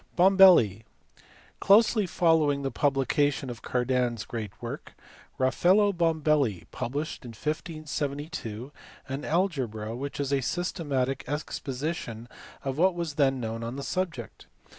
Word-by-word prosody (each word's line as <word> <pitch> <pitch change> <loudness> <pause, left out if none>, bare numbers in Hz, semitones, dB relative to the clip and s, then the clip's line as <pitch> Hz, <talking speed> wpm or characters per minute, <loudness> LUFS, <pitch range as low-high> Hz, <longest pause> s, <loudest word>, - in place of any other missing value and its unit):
Bombelli. 180 - +6 0.8
Closely 215 0 +4
following 160 -5 +2
the 135 - -2
publication 140 -1 +1
of 115 -3 -9
Cardan 125 0 0
s 110 - -7
great 110 -4 -5
work, - - -7 0.5
Rafaello 185 +10 +3
Bombelli 155 - +1
published 145 +6 -4
in 120 -2 -9
1572 150 -4 -4 0.4
an 135 +2 -4
algebra 130 - -1
which 140 +4 -5
is 140 -1 -1
a 135 - +2
systematic 140 -5 -2
exposition 135 -4 -4 0.4
of 135 +1 -3
what 185 +1 +4
was 170 -3 -3
then 135 -2 +2
known 115 -1 -4
on 115 +2 -4
the 140 - -5
subject. 175 -10 -4
140 Hz, 120 wpm, -27 LUFS, 125-165 Hz, 0.8 s, Bombelli